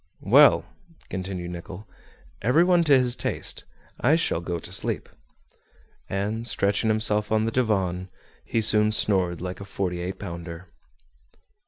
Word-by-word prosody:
"Well," - - +6 0.4
continued 90 -1 -5
Nicholl, 90 +3 -9 0.5
"every 125 - +4
one 175 -1 +4
to 145 -3 +6
his 125 -1 +1
taste; - - -2 0.3
I 145 +6 +4
shall 165 - +1
go 85 0 -3
to - - -5
sleep." - - 0 1.0
And 105 +4 -3
stretching 105 +1 0
himself 110 -1 +1
on 110 0 +2
the 115 - -1
divan, 95 -7 0 0.3
he 115 - -1
soon 105 0 +3
snored 90 -6 +1
like 90 +1 -6
a - - -5
forty 95 -2 -3
eight 90 +2 -4
pounder. 85 +1 -8
100 Hz, 140 wpm, -25 LUFS, 90-110 Hz, 1.0 s, Well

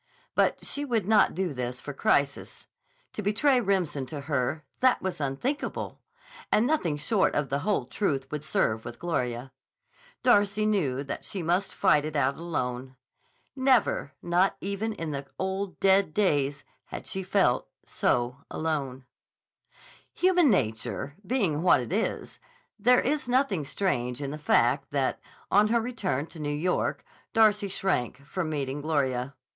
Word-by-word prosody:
But - - +1
she 285 - -3
would 230 -8 0
not 215 -1 +4
do 185 0 0
for - - -6
this 125 -1 -4
crisis! 140 0 -1 0.5
To - - -4
betray 240 +6 +3
Remsen 180 - 0
to 145 +2 -6
her—that 150 - 0
was 185 -4 -4
unthinkable, 145 - -3 0.5
and 215 - +4
nothing 215 - +1
short 190 +7 +1
of 145 -2 0
the 140 - 0
whole 205 +6 0
truth 140 -10 -2
would 150 -1 -4
serve 110 -7 0
with 120 0 -8
Gloria. 125 -6 -2 0.7
Darcy 210 -3 +4
knew 150 -11 +1
that 140 - -5
she 190 -4 -4
must 180 +4 0
fight 145 - +4
it 155 0 -5
out 140 -1 +2
alone. 130 -6 -4 0.6
Never, 260 - +2
not 180 +3 +2
even 200 +3 -3
in 165 -6 -4
the 140 -1 -5
old, 190 0 -3
dead 195 -4 +3
days, 145 -8 +1 0.2
had - - -8
she 190 - -3
felt 185 -9 +1 0.2
so 120 +1 0
alone. 140 -5 -3 1.1
Human 360 -4 +4
nature 130 - -1
being 190 - 0
what 180 - +5
it 125 +7 -4
is, 220 +3 -2 0.4
there 250 +4 +5
is 285 -1 -1
nothing 245 - +2
strange 125 -8 -1
in 140 -1 -4
the 150 - -6
fact 135 -1 +2
that, 140 -2 0 0.3
on 210 +1 +5
her 235 +2 +2
return 205 - -2
to 165 - -13
New 150 -1 -2
York, 160 +5 -1 0.3
Darcy 210 -2 +4
shrank 140 -9 -1
from 170 +2 -3
meeting 145 -2 -3
Gloria. 140 -4 -1
160 Hz, 150 wpm, -27 LUFS, 140-205 Hz, 1.1 s, what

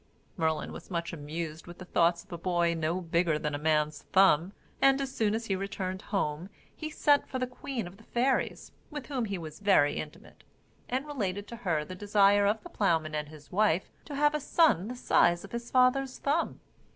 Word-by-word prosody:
Merlin 160 -3 -1
was - - -10
much 170 -2 -3
amused 155 +1 -6
with 175 - -10
the 185 - -9
thoughts 170 -1 +2
of - - -24
a 170 - -4
boy 175 -1 +1
no 165 +2 -1
bigger 170 -2 +1
than 150 -1 -3
a 145 - -2
man's 150 -1 +1
thumb, 185 -2 +5 0.3
and, 270 0 +5
as 270 -1 -3
soon 215 -1 +1
as 225 +1 -3
he 195 - 0
returned 190 -1 -4
home, 175 -4 -2 0.3
he 310 - -5
sent 290 -2 +3
for 260 - -3
the 255 - 0
queen 250 -2 -5
of 175 +2 -11
the 220 - -17
fairies 255 +3 0 0.2
(with 295 -3 -6
whom 260 -5 -1
he 200 -2 -3
was 160 -3 -8
very 195 -8 +4
intimate), 150 - -9 0.5
and 260 +3 -1
related 205 -9 -3
to 235 - -7
her 165 -9 -1
the 185 - -8
desire 200 +1 +4
of 210 +1 0
the - - -9
ploughman 160 -6 +1
and 150 -1 -3
his 150 -1 -14
wife 190 -3 +2
to 290 - -7
have 295 +1 +3
a 300 - 0
son 275 - +3
the 250 - -5
size 175 -7 +3
of 200 - -11
his 235 0 -5
father's 255 +1 +3
thumb. 300 +4 -1
195 Hz, 210 wpm, -29 LUFS, 165-245 Hz, 0.5 s, thumb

